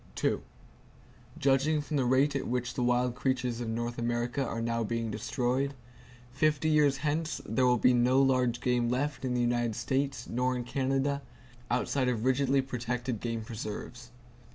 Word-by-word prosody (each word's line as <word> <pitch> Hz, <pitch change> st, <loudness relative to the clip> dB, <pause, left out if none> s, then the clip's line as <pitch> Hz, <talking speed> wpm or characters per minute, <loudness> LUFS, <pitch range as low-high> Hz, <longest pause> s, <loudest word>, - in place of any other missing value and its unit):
Judging 140 Hz, +3 st, +2 dB
from 150 Hz, +1 st, -4 dB
the 135 Hz, -3 st, +2 dB
rate 135 Hz, +3 st, +3 dB
at 140 Hz, -, -2 dB
which 125 Hz, 0 st, -2 dB
the -, -, -3 dB
wild 125 Hz, 0 st, +2 dB
creatures 125 Hz, -2 st, -1 dB
of 115 Hz, -, -3 dB
North 120 Hz, +1 st, -3 dB
America 120 Hz, +3 st, -1 dB
are 115 Hz, -2 st, -3 dB
now 115 Hz, 0 st, -1 dB
being 115 Hz, 0 st, -2 dB
destroyed, 125 Hz, +5 st, -1 dB, 0.6 s
fifty 150 Hz, +3 st, +1 dB
years 150 Hz, -3 st, +4 dB
hence 155 Hz, +2 st, -1 dB
there 125 Hz, +4 st, +2 dB
will 125 Hz, 0 st, +4 dB
be 125 Hz, +2 st, +4 dB
no 125 Hz, +2 st, +4 dB
large 125 Hz, -3 st, +2 dB
game 120 Hz, -1 st, +1 dB
left 140 Hz, +4 st, -1 dB
in 125 Hz, -1 st, -1 dB
the 125 Hz, -, +1 dB
United 120 Hz, -2 st, +1 dB
States 130 Hz, +2 st, -1 dB
nor 125 Hz, +2 st, 0 dB
in 125 Hz, -, -3 dB
Canada, 135 Hz, +2 st, 0 dB, 0.5 s
outside 125 Hz, +1 st, +1 dB
of 115 Hz, -2 st, -1 dB
rigidly 135 Hz, +1 st, +2 dB
protected 125 Hz, -2 st, -3 dB
game 115 Hz, -1 st, -3 dB
preserves. 115 Hz, +2 st, -7 dB
125 Hz, 160 wpm, -30 LUFS, 120-135 Hz, 0.6 s, years